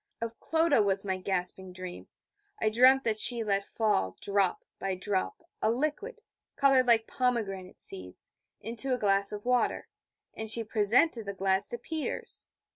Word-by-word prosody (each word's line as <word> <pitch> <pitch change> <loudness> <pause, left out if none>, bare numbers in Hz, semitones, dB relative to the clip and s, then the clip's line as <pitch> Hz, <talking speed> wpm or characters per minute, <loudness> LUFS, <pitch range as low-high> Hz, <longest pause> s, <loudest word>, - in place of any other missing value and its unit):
Of 230 0 -5
Clodagh 320 -6 +2
was 195 0 0
my 190 -1 -1
gasping 185 0 -3
dream. 185 -1 -8 0.5
I 220 - +2
dreamed 260 +4 +6
that 220 -2 0
she 235 +1 +3
let 200 -2 +1
fall, 145 - 0
drop 200 -2 0
by 195 -1 -2
drop, 190 - -2 0.2
a - - +2
liquid, 305 - -2 0.3
coloured 270 -2 +4
like 225 -2 +4
pomegranate 205 -7 -2
seeds, 90 -1 -8 0.3
into 235 +4 -2
a - - -4
glass 200 -2 +2
of 210 +1 -6
water; 250 0 +1 0.4
and 220 0 -6
she 230 +1 0
presented 225 +3 +2
the 200 - -4
glass 190 +1 +1
to 240 - -3
Peters. 315 +5 -5
215 Hz, 155 wpm, -29 LUFS, 195-250 Hz, 0.5 s, dreamed